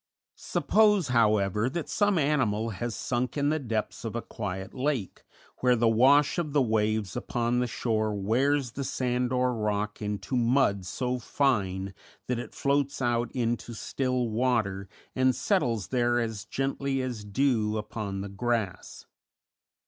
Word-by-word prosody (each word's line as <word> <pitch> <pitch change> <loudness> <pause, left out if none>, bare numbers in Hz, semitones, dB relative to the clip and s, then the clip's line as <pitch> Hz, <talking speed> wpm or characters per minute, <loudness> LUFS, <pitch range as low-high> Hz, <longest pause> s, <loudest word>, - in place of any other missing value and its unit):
Suppose, 210 -8 +2
however, 105 -2 +2
that 165 +3 -4
some 205 -3 +2
animal 120 -8 +1
has 110 +3 -4
sunk 125 +2 -2
in 145 0 +2
the 155 +1 +1
depths 115 -6 -3
of 115 -1 -4
a 120 - -1
quiet 95 -3 -5
lake, 130 -6 -2 0.4
where 125 -1 +4
the 115 0 +2
wash 135 +8 +4
of 155 -4 -3
the 145 - +4
waves 110 -3 0
upon 120 +1 -1
the 125 - +1
shore 110 -2 -1
wears 125 +6 +1
the 140 - -4
sand 125 -1 -1
or 125 0 +1
rock 105 -2 -2
into 105 +3 -3
mud 115 -6 +2
so 125 +6 -2
fine 100 -7 0 0.3
that 125 -1 -1
it 120 - -8
floats 140 0 0
out 120 -2 0
into 120 -1 -2
still 125 +3 -1
water 110 -5 0 0.3
and 130 -1 +3
settles 125 - 0
there 120 -1 +2
as 110 -4 -3
gently 135 0 -1
as 120 -5 -4
dew 110 -1 +1
upon 105 -2 -4
the 100 - -5
grass. 110 0 -3
120 Hz, 150 wpm, -28 LUFS, 105-130 Hz, 0.4 s, where